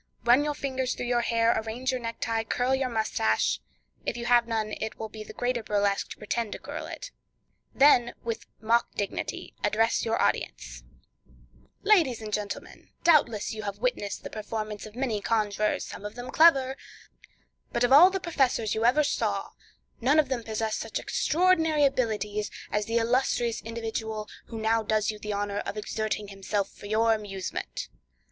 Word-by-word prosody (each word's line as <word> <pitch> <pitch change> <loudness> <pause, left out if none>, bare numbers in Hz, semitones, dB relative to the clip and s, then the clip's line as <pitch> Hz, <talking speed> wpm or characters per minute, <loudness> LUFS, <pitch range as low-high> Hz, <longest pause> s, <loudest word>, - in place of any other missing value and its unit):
run 245 +4 +5
your 295 0 -1
fingers 260 -2 -2
through - - -4
your 240 0 +2
hair, 230 0 +3
arrange 240 +4 -2
your 255 -1 -3
necktie, 230 -1 -2
curl 245 +3 0
your 265 -1 +1
moustache—if 110 - -1
you 240 - -4
have 240 -1 +4
none 220 -2 -1
it 220 0 -4
will 220 - -5
be 215 0 -8
the - - -10
greater 245 -1 -1
burlesque 205 -2 0
to - - -8
pretend 215 +1 -2
to - - -4
curl - - -7
it—and - - -13
then, 250 -4 +6
with 230 -1 -4
mock 230 +2 +2
dignity, 200 - -4
address 225 +2 +2
your 225 0 0
audience: - - -1 1.0
"Ladies 340 - +4
and 215 -1 -7
gentlemen, 205 -1 -5
doubtless 285 -12 +3
you 215 - -5
have 200 -1 -4
witnessed 210 -4 -2
the - - -7
performance 215 -1 -5
of 215 - -14
many 240 -5 -1
conjurors, 210 -1 0
some - - -9
of 210 +1 -6
them 245 +1 -7
clever; 270 -5 +5 1.0
but 235 - 0
of 245 +2 +4
all 335 +7 +10
the 385 0 -2
professors 265 - +1
you 220 - -1
ever 255 +6 +5
saw, 290 - -1 0.5
none 275 +6 +4
of 300 -4 +4
them 260 -2 0
ever 230 - -14
possessed 220 0 -1
such 225 - -3
extraordinary 325 -8 +2
abilities 210 -5 0 0.2
as 210 0 0
the 230 +1 +1
illustrious 235 0 +1
individual 225 -1 -4 0.2
who 230 - -7
now 225 +1 +2
does 215 0 +1
you 210 - -10
the 210 0 -4
honor 205 0 -2
of - - -5
exerting 210 -1 -3
himself 195 0 -2
for 205 - -11
your 225 +2 +3
amusement. 195 -4 -4
225 Hz, 170 wpm, -27 LUFS, 215-255 Hz, 1.0 s, all